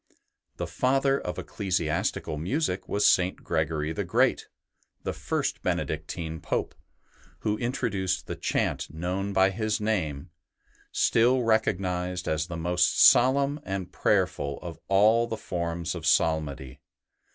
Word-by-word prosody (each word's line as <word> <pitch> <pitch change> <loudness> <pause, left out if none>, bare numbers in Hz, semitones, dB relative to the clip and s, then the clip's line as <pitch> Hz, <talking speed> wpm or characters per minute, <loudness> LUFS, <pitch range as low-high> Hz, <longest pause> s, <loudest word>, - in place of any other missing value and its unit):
The - - -2
father 135 +1 +1
of 90 - -5
ecclesiastical 85 -6 -2
music 90 - -2
was 105 - +1
St. 90 0 +3
Gregory 80 -1 -1
the - - -2
Great, - - +1 0.6
the - - -2
first - - -2
Benedictine 80 +1 -3
Pope, - - -2 0.7
who 105 - 0
introduced 115 -7 -1
the - - -5
chant - - -1
known 90 +5 -3
by 95 0 +4
his 110 +1 -1
name, 85 -10 -2 0.6
still 125 +2 +3
recognized 90 -5 0
as 80 +1 0
the 85 -2 -5
most 90 +2 +1
solemn 140 +3 +5
and 95 -6 -5
prayerful 70 -1 0
of 85 -2 -7
all 110 +4 +4
the 110 - -4
forms 85 -3 -3
of - - -4
psalmody. 70 -4 +1
90 Hz, 125 wpm, -27 LUFS, 80-110 Hz, 0.7 s, solemn